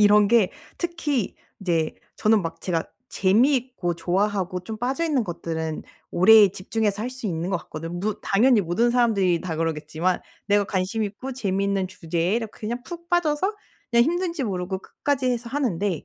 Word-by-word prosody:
이런 210 0 +6
게 225 -4 +4 0.3
특히 315 - -1 0.3
이제 165 -5 0 0.2
저는 215 -1 +3
막 165 0 -5
제가 165 -3 -1 0.2
재미있고 240 -1 +2
좋아하고 185 +1 0
좀 220 - -5
빠져 265 +7 -1
있는 290 -7 +1
것들은 160 -3 -4 0.3
오래 210 +3 +7
집중해서 205 +2 -2
할 240 - -2
수 255 -3 -6
있는 170 -2 -2
것 195 - +2
같거든 165 +1 -6
무 210 +1 -2
당연히 220 +3 +4
모든 195 +7 +1
사람들이 205 -8 +2
다 170 -4 -4
그러겠지만 160 +2 -1 0.3
내가 205 0 +3
관심 195 +3 -1
있고 215 +6 -5
재미있는 195 -4 0
주제에 175 +1 -1
이러 230 -1 -2
그냥 230 +4 -5
푹 340 +1 -9
빠져서 350 +3 +1 0.4
그냥 235 0 +5
힘든지 340 -2 -1
모르고 190 -2 -2
끝까지 270 +6 -2
해서 240 -1 -2
하는데 205 - -1
205 Hz, 355 characters per minute, -24 LUFS, 180-245 Hz, 0.4 s, 오래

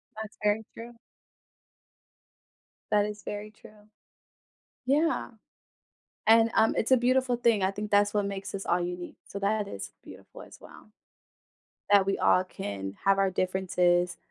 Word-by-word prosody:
That's 220 -1 -8
very 210 +1 +1
true. 230 +1 -9 2.0
That 205 -1 +3
is 210 -1 -7
very 210 +1 -6
true. 210 0 -18 1.0
Yeah. 300 +5 +1 1.0
And, 225 +1 +6
um, 220 - +4
it's 225 - -1
a 260 - +7
beautiful 255 +1 +2
thing, 235 -4 +2
I 190 - +2
think 210 +1 -6
that's 205 0 +3
what 205 -1 +1
makes 200 0 -5
us 195 - -6
all 175 - +1
unique, 175 0 -5
so 200 - -7
that 205 +1 0
is - - -7
beautiful - - -13
as - - -13
well. - - -15 1.0
That 200 -1 +6
we 195 - +1
all 185 - +4
can 100 - -6
have 195 0 +4
our 195 -1 +2
differences, 180 -1 +1
205 Hz, 145 wpm, -28 LUFS, 190-220 Hz, 2.0 s, a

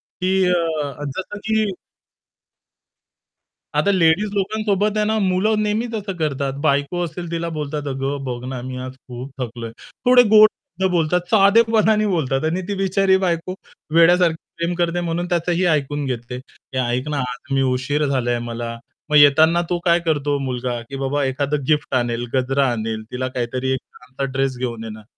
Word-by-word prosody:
की 190 +1 -1
अ 175 - +3 0.2
अ, 145 0 -5
जसं 190 +8 -5
की 220 -1 +1 2.1
आता 150 +7 +3
लेडीज 185 +3 +3
लोकांसोबत 205 +1 0
आहे 210 - +2
ना, 220 +1 +1
मुलं 205 +2 +1
नेहमीच 220 +3 -1
असं 205 -2 -3
करतात. 140 -4 -1
बायको 140 +4 +1
असेल 170 +1 -6
तिला 170 0 -2
बोलतात 150 -1 -3
"अगं 135 +1 -3
बघ 125 -1 -5
ना, 130 -1 -4
मी 130 - -5
आज 130 - -6 0.2
खूप 125 +2 -7
थकलोय" 115 -2 -5 0.3
थोडे 250 0 +7
गोड 215 0 +8 0.3
शब्द 190 0 +2
बोलतात, 175 0 +2
साधेपणाने 215 +1 +4
बोलतात 155 -8 0
आणि 165 +4 0
ती 205 - -1
बिचारी 195 0 +2
बायको, 175 +1 -1 0.4
वेड्यासारखी 170 0 +5 0.2
प्रेम 170 +1 -1
करते 175 0 0
म्हणून 170 +2 -1
त्याचंही 175 +1 0
ऐकून 145 -3 0
घेते. 125 -1 -4 0.4
"ए - - 0
ऐक 125 +2 -1
ना, 150 -1 -1
आज 125 +1 -6
मी 135 - +2
उशीर 145 +4 -1
झालाय 125 -3 0
मला". 115 0 -4 0.3
मग 150 - +4
येतांना 155 +4 +6
तो 175 - +1
काय 170 -1 +4
करतो 145 -2 +1
मुलगा, 125 -1 -3
की 135 - -6
बाबा 140 +1 0
एखादं 140 +2 -1
गिफ्ट 150 -3 +1
आणेल, 120 -1 0
गजरा 135 +1 +2
आणेल, 110 -1 -3
तिला 130 +1 -3
काहीतरी 125 +2 -2
एक 130 - -1
चांगलं 130 +2 -7
ड्रेस 135 -1 0
घेऊन 120 -3 -4
येणार. 110 -1 -8
150 Hz, 165 wpm, -21 LUFS, 130-185 Hz, 2.1 s, गोड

